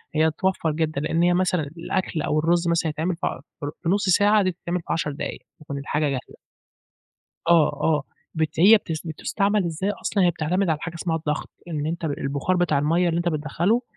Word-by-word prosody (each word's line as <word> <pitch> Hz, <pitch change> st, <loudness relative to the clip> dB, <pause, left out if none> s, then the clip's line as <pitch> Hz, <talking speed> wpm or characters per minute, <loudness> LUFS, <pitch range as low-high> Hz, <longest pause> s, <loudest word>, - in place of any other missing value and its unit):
هي 160 Hz, +1 st, +4 dB
بتوفّر 165 Hz, 0 st, 0 dB
جدًا 155 Hz, -2 st, -1 dB
لأن 165 Hz, +3 st, +1 dB
هي 175 Hz, 0 st, +4 dB
مثلًا 180 Hz, -1 st, +2 dB, 0.2 s
الأكل 170 Hz, -1 st, -2 dB
أو 150 Hz, +1 st, +1 dB
الرز 170 Hz, +2 st, +2 dB
مثلًا 170 Hz, -1 st, +1 dB
يتعمل 160 Hz, +4 st, -1 dB
في 165 Hz, -, -2 dB
عش -, -, -4 dB, 0.2 s
في 145 Hz, -, -5 dB
ربع 145 Hz, -, -4 dB
في 165 Hz, -, 0 dB
نُصّ 200 Hz, +1 st, +1 dB
ساعة 205 Hz, +2 st, +5 dB
دي 185 Hz, -, +1 dB
بتتعمل 175 Hz, 0 st, -3 dB
في -, -, 0 dB
10 160 Hz, -2 st, -1 dB
دقايق 140 Hz, -, -5 dB, 0.2 s
تكون 145 Hz, -2 st, -6 dB
الحاجة 150 Hz, +2 st, -1 dB
جاهزة. 130 Hz, -2 st, -5 dB, 1.1 s
آه، 170 Hz, -3 st, +6 dB
آه 150 Hz, -3 st, +2 dB, 0.3 s
بت 160 Hz, 0 st, -1 dB
هي 210 Hz, +6 st, +8 dB
بتس 165 Hz, -4 st, -6 dB
بتُستَعمل 200 Hz, +5 st, 0 dB
إزاي 170 Hz, +4 st, -2 dB
أصلًا، 205 Hz, -1 st, 0 dB
هي 175 Hz, -, +4 dB
بتعتمد 175 Hz, +4 st, 0 dB
على 155 Hz, -2 st, +1 dB
حاجة 170 Hz, 0 st, -5 dB
اسمها 165 Hz, -1 st, -1 dB
الضغط، 150 Hz, -2 st, -3 dB, 0.2 s
إن 150 Hz, -3 st, -3 dB
أنت 170 Hz, +1 st, -3 dB
البُخار 140 Hz, +3 st, -1 dB
بتاع 175 Hz, -5 st, +2 dB
المَيَّة 165 Hz, +5 st, +2 dB
اللي 165 Hz, -, 0 dB
أنت 175 Hz, 0 st, +1 dB
بتدخّله 165 Hz, -, 0 dB
165 Hz, 205 wpm, -24 LUFS, 155-180 Hz, 1.1 s, هي